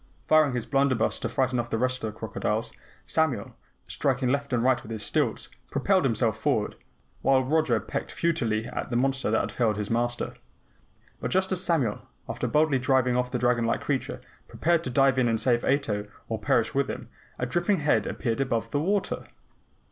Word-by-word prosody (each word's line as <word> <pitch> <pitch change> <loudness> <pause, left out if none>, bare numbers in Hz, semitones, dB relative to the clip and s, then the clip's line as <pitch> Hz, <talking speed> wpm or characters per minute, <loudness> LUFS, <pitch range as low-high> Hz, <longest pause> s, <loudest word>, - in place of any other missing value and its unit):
Firing 155 -4 +4
his 120 - -2
blunderbuss 135 -5 +1
to - - -2
frighten 130 -2 0
off 120 0 -3
the 115 - 0
rest 130 +1 -1
of 110 - -2
the 110 - -18
crocodiles, - - -2 0.3
Samuel, 140 -10 0 0.3
striking 135 -2 0
left 140 +1 -1
and 120 -2 +1
right 130 0 +3
with 110 - -10
his 110 -2 -4
stilts, - - 0 0.2
propelled - - +2
himself - - +1
forward, - - 0 0.5
while 135 -1 +4
Roger 135 -4 +2
pecked - - -5
futilely 120 -10 0
at - - -5
the 120 - -2
monster 135 +1 +1
that 110 - +3
had - - -2
felled 110 -4 +1
his 105 0 -3
Master. 120 +1 -1 0.9
But - - -3
just 190 +1 +1
as 185 -1 0
Samuel, 145 - +1 0.3
after - - -3
boldly 150 -3 +3
driving 130 -1 +2
off 125 0 0
the - - -1
dragon 120 -1 +2
like 115 - 0
creature, 135 -3 -2 0.3
prepared 170 0 +1
to - - -2
dive 135 +1 +3
in 125 - +3
and 115 -1 +1
save 120 -1 +2
Ato 110 -7 0 0.2
or 110 -1 -3
perish 110 +1 +1
with 140 0 +1
him, - - -5 0.3
a 125 - -1
dripping 175 +10 +1
head 150 - +2
appeared 115 +1 -2
above 115 -4 -1
the 145 - +1
water. 195 +6 -1
130 Hz, 195 wpm, -27 LUFS, 115-140 Hz, 0.9 s, Firing